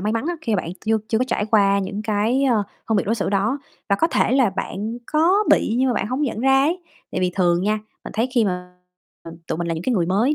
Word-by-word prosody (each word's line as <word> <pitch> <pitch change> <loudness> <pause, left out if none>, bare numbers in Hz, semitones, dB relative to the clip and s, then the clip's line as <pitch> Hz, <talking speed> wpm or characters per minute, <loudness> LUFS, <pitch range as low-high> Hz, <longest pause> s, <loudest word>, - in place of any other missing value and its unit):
may 210 +3 -1
mắn 230 +7 -1
á, 350 - -1
khi 225 -7 -1
mà - - -1
bạn 165 - -6 0.2
chưa 220 0 +3
chưa 220 - +1
có 255 - +2
trải 210 - 0
qua 200 -2 +4
những 200 +2 -3
cái, 220 +5 +1
ờ, 230 -6 +3 0.3
phân 220 - +2
biệt - - +1
đối 225 - +2
xử 200 -3 -2
đó. 210 +8 +1 0.3
Và 200 - +3
có 330 - +3
thể 250 - +1
là 260 -5 +4
bạn 220 +5 -4
có 355 +7 +3
bị 225 - +3
nhưng 260 0 +3
mà 245 - +1
bạn - - -1
hông 255 +6 -2
nhận 230 -5 -2
ra 270 +1 +4
ấy, 345 +5 0 0.3
tại - - -1
vì 180 -1 +1
thường 175 -1 +2
nha, 210 +2 +1 0.3
mình - - -7
thấy 230 +4 0
khi 235 -3 +4
mà 180 -1 -3 0.7
tụi - - -3
mình 170 - -2
là 165 - 0
những 160 - -5
cái 245 +5 0
người 170 -4 +1
mới 220 +11 +2
220 Hz, 280 wpm, -22 LUFS, 195-255 Hz, 0.7 s, qua